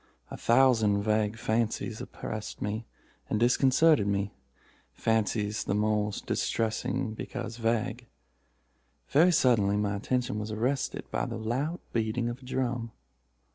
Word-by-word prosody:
A - - -4
thousand 115 -5 +4
vague 110 0 +1
fancies 115 0 -1
oppressed 110 -1 -6
and 105 0 -5
disconcerted 130 +1 +4
me—fancies 105 - -2
the 100 - 0
more 105 0 +1
distressing 110 +1 -1
because 115 0 -6
vague. 115 +1 -1 1.0
Very 165 +6 +5
suddenly 110 - +3
my 105 0 0
attention 120 +1 -1
was 105 0 -4
arrested 125 +5 -1
by - - -1
the - - -4
loud 130 +10 -2
beating 115 +1 0
of 120 +2 -5
a 130 - -15
drum. 120 -3 -2
110 Hz, 115 wpm, -29 LUFS, 105-125 Hz, 1.0 s, Very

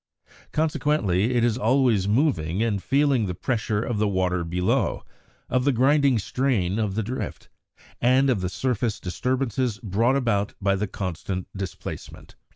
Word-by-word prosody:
Consequently 135 - +1
it 120 - +3
is 120 0 +1
always 120 -4 +3
moving 105 - +1
and 105 -4 0
feeling 135 - +2
the 90 - -3
pressure 110 -1 -1
of 115 -4 -2
the 105 - +2
water 90 -2 0
below, 90 +2 0 0.4
of 130 0 +1
the 140 - +3
grinding 135 +1 +3
strain 110 -4 0
of 105 -3 -1
the 110 - 0
drift, 125 +5 -5 0.5
and 130 +3 +4
of 120 -8 +1
the 90 - -1
surface 120 0 -1
disturbances 125 +3 -1
brought 115 +4 +1
about 105 -7 0
by 100 -1 +2
the 105 +2 -2
constant 95 0 -4
displacement. 95 -3 -7
110 Hz, 150 wpm, -24 LUFS, 95-130 Hz, 0.5 s, and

